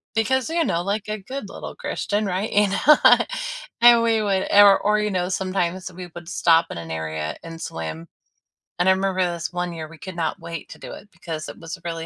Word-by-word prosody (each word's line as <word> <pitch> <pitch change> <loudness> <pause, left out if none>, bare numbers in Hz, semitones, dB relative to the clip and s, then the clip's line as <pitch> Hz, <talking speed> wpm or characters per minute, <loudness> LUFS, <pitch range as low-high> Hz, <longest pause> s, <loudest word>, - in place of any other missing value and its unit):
because, 260 +4 +1
you 335 0 +1
know, 170 - 0
like 205 +2 -2
a 215 - -2
good 230 0 -7
little - - -8
Christian, 210 +1 -2
right? 190 +3 -2
You 205 0 +4
know? 290 +10 +5 0.9
And 240 -1 +8
we 225 -1 +2
would 195 -2 0
or 200 -1 +8
or, 210 +1 +2
you 210 -1 -1
know, 180 -1 -1
sometimes 185 -1 -2
we 180 0 -8
would 175 0 -9
stop 165 -1 +3
in - - -6
an 85 -1 -7
area 80 -1 -4
and 165 0 -9
swim. 80 - -6 0.7
And 180 - +2
I - - +7
remember 190 -1 0
this 170 -1 -3
one 175 -1 -3
year, 160 -1 -6
we 165 - -13
could 185 +3 -9
not 165 +3 -2
wait 165 -1 -7
to - - -11
do - - -9
it 205 - -12
because 155 -2 -6
it - - -10
was 165 -1 -7
really 165 -1 -4
185 Hz, 220 wpm, -23 LUFS, 165-205 Hz, 0.9 s, And